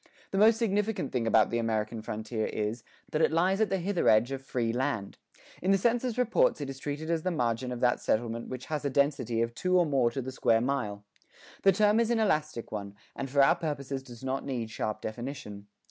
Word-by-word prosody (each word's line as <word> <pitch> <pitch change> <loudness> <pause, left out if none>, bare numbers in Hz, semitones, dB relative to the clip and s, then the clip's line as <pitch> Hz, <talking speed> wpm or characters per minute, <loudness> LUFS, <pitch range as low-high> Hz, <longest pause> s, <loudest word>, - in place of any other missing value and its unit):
The 195 - 0
most 220 +2 +6
significant 210 - 0
thing 120 -3 -1
about 110 -1 +4
the 120 - 0
American 110 -1 -1
frontier 110 +1 -3
is, 110 +2 -3 0.3
that 155 - 0
it - - +4
lies 185 +5 +2
at 220 - +2
the 195 - +1
hither 190 +1 +1
edge 110 +4 +4
of 135 -1 -4
free 120 -4 -2
land. 120 -6 -2 0.4
In 185 - -1
the 195 - +5
census 240 +3 0
reports 245 -8 +2
it 140 -2 -4
is 135 - -10
treated 150 +3 -4
as 165 -1 +1
the 185 - -1
margin 125 -6 -1
of 125 - -5
that 125 -1 +3
settlement 115 +1 -1
which 130 0 -6
has 150 -2 -3
a 140 - 0
density 135 -4 +1
of 115 0 -3
two 185 +8 +1
or 175 - +4
more 135 -6 +2
to 135 +3 -4
the 130 - -5
square 115 -3 +2
mile. 115 -5 -2 0.6
The 195 - +6
term 210 +3 +3
is 235 -1 +2
an 235 -1 +2
elastic 155 - 0
one, 100 -1 -5 0.2
and 135 - -4
for 140 +1 +4
our 135 - +5
purposes 140 -5 -4
does 120 -2 -13
not 130 +1 -2
need 120 -5 -4
sharp 110 -1 -3
definition. 110 -3 -6
135 Hz, 225 wpm, -29 LUFS, 115-170 Hz, 0.6 s, most